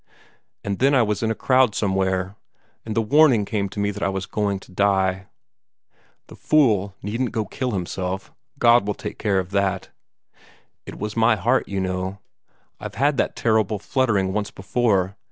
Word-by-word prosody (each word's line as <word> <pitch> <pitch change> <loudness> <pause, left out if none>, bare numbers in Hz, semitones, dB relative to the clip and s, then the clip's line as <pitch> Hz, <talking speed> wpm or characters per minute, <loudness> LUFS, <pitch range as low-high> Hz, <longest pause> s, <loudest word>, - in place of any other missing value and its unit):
And 100 -1 -3
then 140 +2 +4
I 125 - +5
was 105 -2 -1
in 110 - 0
a 110 - -1
crowd 130 -3 +3
somewhere, 95 -1 0 0.5
and 110 - -3
the 115 - +2
warning 130 -3 +4
came 100 -2 -2
to 105 - -7
me 100 0 0
that 105 +1 -8
I - - +1
was 95 -1 -3
going 100 -2 -2
to - - -16
die. 95 -1 +1 1.0
The - - -13
fool 105 -10 +2
needn't 115 +4 -2
go 110 -3 -1
kill 130 +6 -3
himself: 95 -1 -4 0.2
God 120 -4 +4
would 105 - -2
take - - -7
care 100 -3 +1
of 95 0 -2
that. 95 -1 -1 1.0
It - - -8
was 105 +1 -5
my 115 0 +4
heart, 95 - +1
you 100 -1 -3
know. 95 +1 -3 0.6
I've - - -7
had 140 +4 +1
that - - 0
terrible 110 -2 +1
fluttering 100 -4 0
once 105 0 -2
before. 95 -2 0
100 Hz, 175 wpm, -22 LUFS, 95-115 Hz, 1.0 s, I